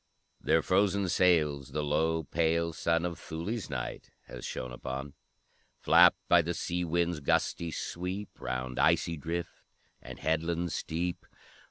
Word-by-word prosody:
Their 80 - +3
frozen 100 0 +2
sails 75 -7 +2
the 75 0 -1
low, 80 +2 +1
pale 85 +2 0
sun 85 0 +1
Of 85 -1 -4
Thulë's 95 +7 -4
night 65 -4 -5
has - - -10
shone 65 0 -5
upon; 65 +3 -6 0.7
Flapped - - +6
by 90 - +6
the 85 +1 -3
sea 90 +1 -2
wind's 85 0 0
gusty 85 +4 0
sweep 90 +5 -5
Round 65 0 -3
icy 85 - +3
drift, 85 +3 -5 0.4
and - - -9
headland 80 +2 -1
steep. 85 +2 -3
85 Hz, 135 wpm, -30 LUFS, 75-85 Hz, 0.7 s, Flapped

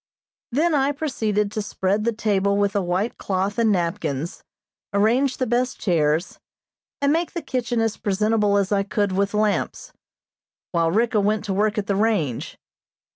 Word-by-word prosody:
Then 315 +7 +2
I 280 0 +2
proceeded 220 -9 -1
to 215 - -2
spread 205 +1 -1
the 235 - +2
table 200 -3 +1
with 200 -1 +1
a 200 - +2
white 185 +5 -1
cloth 195 +2 -1
and 225 -2 +3
napkins, 170 -4 -2 0.5
arrange 240 +7 +2
the 255 - 0
best 250 +2 0
chairs, 160 -2 0 0.6
and 280 +1 +4
make 335 +1 -1
the 340 - -3
kitchen 245 -2 -1
as 225 -2 0
presentable 210 0 +1
as 200 -1 0
I 200 -1 +3
could 200 0 -1
with 200 +2 0
lamps, 210 -1 -1 0.8
while 165 -2 +2
Ricka 220 +4 +2
went 210 +1 +1
to 200 - -1
work 210 +3 +1
at 205 - 0
the 200 - 0
range. 195 - 0
210 Hz, 165 wpm, -23 LUFS, 195-230 Hz, 0.8 s, and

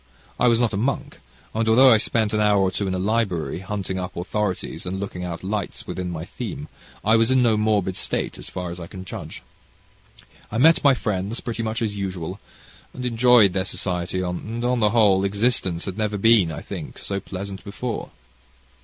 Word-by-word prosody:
I 125 - +4
was 115 -1 +4
not 120 -2 +1
a - - 0
monk, 130 +7 -2 0.3
and, 110 0 0
although 130 +4 +7
I 110 - +7
spent 110 0 0
an 110 - +1
hour 105 -1 +4
or 95 -1 +2
two 100 +1 -2
in 95 - -1
a - - -1
library, 95 -5 0
hunting 95 -1 -3
up 90 0 -5
authorities 90 -2 -3
and 95 +1 -3
looking 95 -2 -5
out 85 -1 -5
lights 100 0 -3
upon 90 -1 -4
my 85 -1 -5
theme, - - -6 0.4
I 110 +2 +5
was 115 +1 +4
in 130 -1 +4
no 115 -2 +4
morbid 105 -3 +1
state - - -2
as - - -8
far 90 -1 -5
as 90 - -7
I 85 - -7
can 95 +1 -9
judge. - - -8 1.1
I 110 - -2
met 160 +7 +5
my 140 -2 +6
friends 105 0 -2
pretty 115 -2 -4
much 115 +2 -2
as 105 -2 -2
usual 95 -2 -4 0.6
and 125 - -5
enjoyed 120 -4 +5
their 95 -1 +1
society, 90 -1 -2
and, 110 +6 -3
on 125 0 +1
the 105 -2 +4
whole, 100 -4 +4
existence 100 -4 +1
had 95 +2 -5
never 105 -1 0
been, 105 -5 +5
I 75 - -6
think, - - -7
so 100 0 -3
pleasant 95 0 -7
before. 115 +4 -4
100 Hz, 200 wpm, -23 LUFS, 95-115 Hz, 1.1 s, although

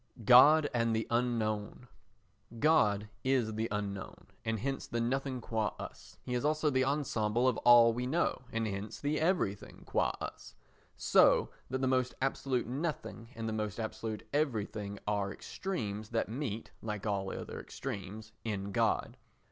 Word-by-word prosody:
God 145 +6 +8
and 115 -2 +2
the 110 - 0
Unknown 115 -1 -1 0.7
God 110 -8 +3 0.2
is 130 -4 +1
the 110 +1 -1
unknown, 100 -2 -4 0.2
and 115 -1 -1
hence 135 +5 -3
the 115 - -2
nothing 130 +2 -1
qua 110 -3 -1
us. - - -10
He 125 - -4
is 125 - 0
also 155 0 +2
the 130 -1 +3
ensemble 125 -4 +1
of 125 - +2
all 120 -1 +7
we 125 +2 -2
know, 160 0 0
and 115 0 -1
hence 100 0 -4
the 145 +2 0
everything 160 - -1
qua - - +1
us. - - -7 0.4
So - - +5 0.2
that 130 +1 -2
the 130 - +2
most 130 -1 +1
absolute 130 -1 0
nothing 130 -4 -4
and 115 0 -4
the 110 - -2
most 105 -1 -3
absolute 110 0 -4
everything 105 -8 -1
are 100 -1 0
extremes 110 - -4
that 115 -1 0
meet 115 -3 -4
(like 105 -2 -4
all 100 -2 -1
other - - -6
extremes) 110 -3 -6
in 100 -3 -3
God. - - +1
115 Hz, 155 wpm, -32 LUFS, 105-130 Hz, 0.7 s, God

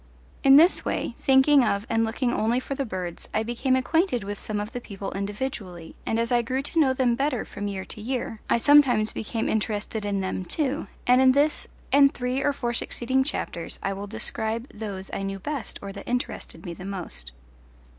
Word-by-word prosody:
In 270 0 +8
this 330 +6 +6
way, - - -2
thinking 270 +1 +5
of 200 -2 0
and 225 0 +2
looking 240 +2 0
only 235 +2 +1
for 265 - -5
the 275 0 -2
birds, 180 -4 -5
I 215 - +2
became 240 +3 0
acquainted 260 - +1
with 205 +1 -5
some 210 -1 -3
of 210 +2 -4
the 245 - -5
people 200 -3 -6
individually, 200 -4 -5
and 225 - +1
as 230 +1 0
I 240 -1 +4
grew 260 +3 -2
to 325 +3 -1
know 280 -4 +5
them 260 -2 +2
better 265 0 0
from 205 0 -5
year 190 -1 -4
to 210 - -9
year 235 -2 -3
I - - +4
sometimes 245 -5 +5
became 225 +1 -2
interested 215 0 -1
in 200 -1 -1
them 185 0 -2
too, 290 - -2 0.2
and 250 +1 +5
in 260 0 +6
this 290 +2 +2 0.2
and 280 0 +6
three 250 +2 -2
or 290 - +2
four 240 -4 -2
succeeding 260 +2 0
chapters 175 - -4
I 195 - 0
will 200 +1 -6
describe 220 +3 -3
those 200 -3 -6
I - - -2
knew 195 0 -3
best 270 +6 -4
or 200 - -5
that 200 - -9
interested 245 -8 -3
me 175 - -4
the 180 - -10
most. 180 - -6
230 Hz, 205 wpm, -26 LUFS, 200-265 Hz, 0.2 s, In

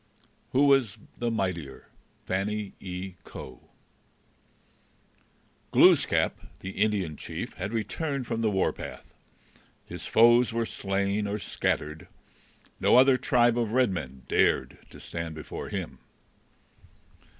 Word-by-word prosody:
Who 140 +3 +4
was 135 -8 +3 0.2
the 120 - 0
Mightier? 90 - -3 0.4
FANNY 100 +2 -2
E. 90 0 -6
COE - - -10 2.1
Glooskap, - - +4 0.2
the 95 - -5
Indian 100 -6 0
chief, - - -6
had 95 +3 -5
returned 135 +5 -2
from 115 0 -2
the 110 - +2
warpath. 95 -2 -3 0.7
His - - -7
foes 120 +2 +5
were 115 0 -1
slain 100 0 -1
or 100 +1 -2
scattered. 80 -4 -2 0.7
No - - +4
other 130 +1 +7
tribe 120 -1 +3
of 115 -2 -1
red 125 -4 +3
men 65 -8 -6
dared - - +1
to - - -13
stand 85 -1 -6
before 80 - -7
him. - - -5
105 Hz, 115 wpm, -27 LUFS, 95-120 Hz, 2.1 s, other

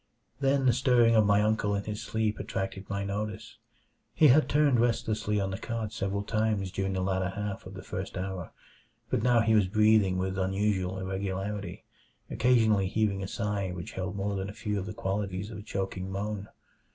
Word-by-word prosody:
Then 135 -1 +2
the 125 - +5
stirring 120 -2 +4
of 110 -2 +5
my 105 0 +4
uncle 105 -1 +1
in 100 - -2
his 105 +1 -5
sleep 110 0 -1
attracted 95 0 -4
my 100 0 -2
notice. 105 +2 -4 0.6
He 155 - +6
had 150 +5 +5
turned 145 -4 +4
restlessly 110 -3 +1
on 95 -1 -1
the 95 - -4
cot 115 -2 -4
several 100 -1 -2
times 110 -3 0
during 95 0 -2
the 95 - -1
latter 95 0 0
half 100 0 -5
of - - -10
the - - -8
first - - -5
hour, 95 -2 -4 0.6
but - - +1
now 120 0 +4
he 110 0 +3
was 105 -3 +4
breathing 105 -2 +4
with 95 +1 -2
unusual 95 -1 0
irregularity, 95 +2 -4 0.5
occasionally 110 -5 +3
heaving 100 -1 0
a 95 - -3
sigh 100 -1 -2
which 90 -2 -6
held 95 0 -4
more 100 0 -2
than 95 0 -3
a - - -7
few 105 -1 -2
of 95 - -5
the 105 - -5
qualities 100 +1 -3
of 105 - -7
a - - -7
choking 95 -2 -4
moan. 100 +1 -3
100 Hz, 190 wpm, -29 LUFS, 95-110 Hz, 0.6 s, He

